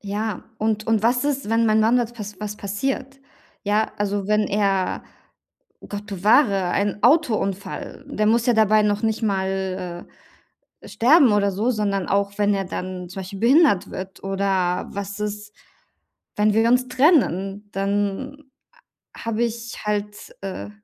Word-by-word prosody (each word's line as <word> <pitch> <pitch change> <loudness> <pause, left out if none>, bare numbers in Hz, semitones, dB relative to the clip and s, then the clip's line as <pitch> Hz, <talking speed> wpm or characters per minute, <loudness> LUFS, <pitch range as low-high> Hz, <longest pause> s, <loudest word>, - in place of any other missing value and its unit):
Ja, 205 0 -4
und 215 0 -1
und 225 -2 +2
was 245 +3 +2
ist, 275 -5 -1
wenn 230 +1 +2
mein 215 0 +3
Mann 225 +3 +4
wat 240 -1 -3
was 210 -1 -8
was 210 0 -5
passiert? 270 +6 -3 0.4
Ja, 210 +1 0
also, 205 -1 -1
wenn 210 +1 +2
er- 195 -2 0 0.9
Gott 205 +1 -7
bewahre- 200 0 +3
ein 205 +2 -1
Autounfall 235 - 0
der 215 - -1
muss 230 +2 +3
ja 245 - +5
dabei 215 -1 +4
noch 210 0 0
nicht 220 0 0
mal, 190 -3 -2 0.8
äh, - - -11
sterben 265 0 +5
oder 200 -1 +2
so, 210 +6 -1
sondern 200 -4 -1
auch 200 +1 0
wenn 205 0 +2
er 195 -1 -2
dann 180 0 -6
zum 190 - -7
Beispiel 190 +1 -8
behindert 265 - +4
wird 190 -1 -8
oder 195 -2 0
was 200 +1 -6
ist 210 0 -5 0.8
wenn 210 0 +3
wir 225 +2 +3
uns 250 +1 +3
trennen, 215 - +2
dann 205 +9 -2 0.7
a - - -11
habe 230 +1 0
ich 235 -1 -5
halt, 210 0 -4
äh, 185 - -6
210 Hz, 155 wpm, -22 LUFS, 195-230 Hz, 0.9 s, ja